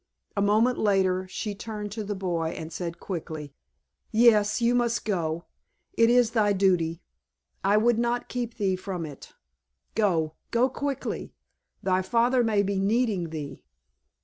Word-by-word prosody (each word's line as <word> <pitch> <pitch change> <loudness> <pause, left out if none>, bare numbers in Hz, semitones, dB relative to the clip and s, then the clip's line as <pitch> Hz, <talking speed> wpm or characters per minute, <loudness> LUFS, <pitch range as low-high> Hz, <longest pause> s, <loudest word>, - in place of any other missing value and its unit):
A 200 - +1
moment 215 +5 +3
later 190 -3 +2
she 205 +3 -4
turned 210 -1 -6
to 215 +1 -4
the 205 0 -3
boy 170 -4 -2
and 160 0 -7
said 170 -1 -5
quickly, 160 -5 -6 0.6
"Yes, 215 -2 +4
you 235 0 +3
must 240 -1 +1
go. 170 -5 -1 0.5
It 230 0 +4
is 245 -2 +4
thy 210 -3 +3
duty—I 185 +2 -1
would 230 +1 +3
not 240 0 0
keep 240 -2 -4
thee 195 -4 +1
from 185 -2 -5
it. 145 -3 -11 0.6
Go—go 205 +5 +1
quickly! 275 +1 -4 0.5
Thy 185 -1 +2
father 240 +5 +2
may 215 -3 +2
be 200 -1 -1
needing 200 -4 +1
thee!" 145 -4 -7
205 Hz, 140 wpm, -27 LUFS, 180-230 Hz, 0.6 s, Yes